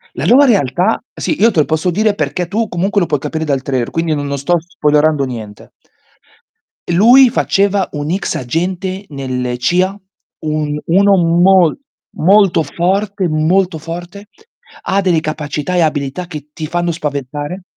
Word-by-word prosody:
La - - -3
nuova 270 +4 +6
realtà 195 - +1
sì 305 - -3
io 230 - +5
te 170 - +1
lo - - +3
posso 160 +4 0
dire 210 +4 +1
perché 155 +1 -2
tu 215 +5 -2
comunque 195 +4 0
lo 175 - +1
puoi 150 - 0
capire 160 +4 -4
dal 140 -3 -1
trailer, 130 -4 -2
quindi 165 -1 -1
no 145 - -3
non 140 0 -3
sto 155 +6 +1
spoilerando 150 -3 +1
niente. 110 -5 -8 1.2
E - - 0
lui 245 +8 +7
faceva 200 -4 +1
un 145 0 -4
ex 190 +3 -2
agente 185 +8 -3
nelle 130 -3 -3
CIA, 180 +9 0 0.5
un 150 -1 -2
uno 195 +3 +4
mol 175 +1 +3 0.4
molto 195 -1 +4
forte 190 +5 -1
molto 165 +3 +1
forte. 175 +5 -8 0.6
Ha 195 +1 0
delle 180 -4 +1
capacità 155 +1 -4
e - - +3
abilità 150 +1 -1
che 150 -4 -9
ti 155 0 -6
fanno 175 +2 -1
spaventare. 145 +2 -4
170 Hz, 160 wpm, -15 LUFS, 150-190 Hz, 1.2 s, lui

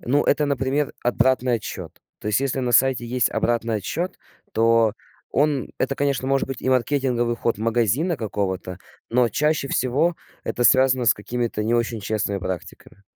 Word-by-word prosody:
Ну 140 +4 +1
это, 150 +1 +2
например, 140 +1 0
обратный 125 +1 +2
отсчет. 110 -4 -5 0.3
То - - -8
есть 105 +3 +2
если 135 -1 -1
на 125 -1 -1
сайте 125 -1 +3
есть 125 0 +1
обратный 115 -1 0
отсчет, 165 - -3 0.3
то 115 -1 +3 0.4
он 145 -2 +1
это, 135 +1 0
конечно, 140 -2 -1
может 135 0 +1
быть 135 - -6
и - - -1
маркетинговый 125 -2 +1
ход 115 - -1
магазина 120 - +1
какого-то, 95 -5 -3 0.3
но 120 0 +3
чаще 150 +1 0
всего 150 +7 +1 0.3
это 120 - -2
связано 130 0 +4
с 115 - +5
какими-то 115 0 -3
не 115 +2 +1
очень 115 -1 -1
честными 100 -1 -1
практиками. 95 +2 -7
125 Hz, 160 wpm, -23 LUFS, 115-135 Hz, 0.4 s, с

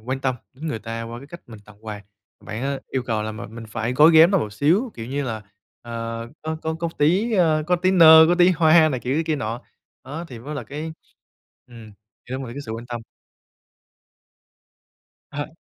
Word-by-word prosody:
quan 130 +4 -4
tâm 130 -1 0 0.2
đến 145 +5 -8
người 115 - -3
ta 115 +1 -6
qua 115 +1 -7
cái 140 - -12
cách 170 +4 -11
mình 115 -3 -11
tặng 105 +1 -18
quà. 105 -1 -6 0.4
Bạn 110 +3 -6
á 140 0 -2
yêu 130 - -2
cầu 110 -3 -2
là 110 0 -4
m - - -10 0.2
mình 115 -1 -8
phải 110 +2 -3
gói 150 +5 +6
ghém 160 +2 +7
nó 195 - +3
một 105 - -4
xíu 170 - +1
kiểu 115 - -7
như 140 +3 -2
là, 110 -4 -4 0.4
ờ, 115 0 -5
có 160 0 -3
có 160 0 -2
có 170 - -1
tí, 185 +11 +2
a, 160 -6 +3
có 180 0 +2
tí 185 +2 +1
nơ, 160 -3 +9
có 175 - +4
tí 175 0 +5
hoa 160 -2 +5
này 130 -5 -3
kiểu 135 +7 -1
kia 155 - 0
nọ, 115 -1 -4 0.4
đó, 150 +6 -6
thì 125 - -9
mới 140 +6 -7
là 145 - -4
cái, 155 +3 -6 0.7
ừm, 115 -3 -13 0.4
đem 130 +1 -3
lại 120 -3 -7
cái 140 - -6
sự 110 - -5
quan 115 +2 -7
tâm. 120 -1 -5 2.3
À. 145 +2 -6
135 Hz, 215 wpm, -22 LUFS, 115-160 Hz, 2.3 s, nơ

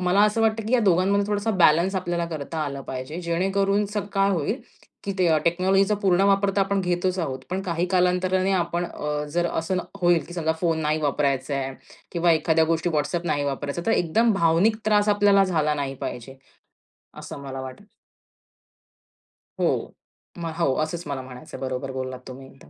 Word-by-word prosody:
मला 180 +2 +2
असं 210 +2 +1
वाटतं, 220 -1 +1
की 235 - -3
या 250 - +5
दोघांमध्ये 195 +1 +2
थोडासा 205 +1 -1
बॅलन्स 175 0 +4
आपल्याला 175 -2 -1
करता 160 -1 -5
आलं 140 -2 -3
पाहिजे. 130 +7 -6
जेणेकरून 195 +4 +1
स 210 +1 -9 0.2
काय 195 0 +2
होईल, 190 - -1 0.4
की 200 - -2
ते 180 -2 +3 0.2
टेक्नॉलॉजीचा 190 +4 +2
पूर्ण 185 -1 +3
वापर 195 0 +3
तर - - +4
आपण 195 0 +1
घेतच 180 +1 -1
आहोत, 135 -6 -2
पण 185 +1 -1
काही 175 -1 -1
कालांतराने 185 +1 +2
आपण 175 -1 0 0.5
जर 175 0 +1
अ, - - -2
असं 165 +3 -1 0.2
होईल, 175 -2 +3
की 175 - -8
समजा 160 -2 0
फोन 165 -2 +1
नाही 155 +1 0
वापरायचं 140 -1 0
आहे 135 -1 -3 0.4
किंवा 170 -1 +3
एखाद्या 160 0 +3
गोष्टीत 165 +1 0
WhatsApp 165 +3 -1
नाही 145 -3 0
वापरायचाय, 140 +4 -3
तर 225 - +3
एकदम 220 +7 +2
भावनिक 180 +4 +3
त्रास 210 -1 +3
आपल्याला 205 -1 +4
झाला 155 -5 +1
नाही 140 -2 -3
पाहिजे. 130 +3 -6 0.8
असं - - -8
मला 135 -1 -6
वाटतं 130 +10 -9 1.8
हो - - +3 0.7
म 170 - -5
हो, 135 -6 +2
असंच 170 +2 -4
मला 140 -2 -3
म्हणायचंय. 130 +5 -10
बरोबर 130 0 -4
बोललात 130 -1 -5
तुम्ही 130 +1 -10
एकदम. 135 0 -18
175 Hz, 175 wpm, -24 LUFS, 150-195 Hz, 1.8 s, या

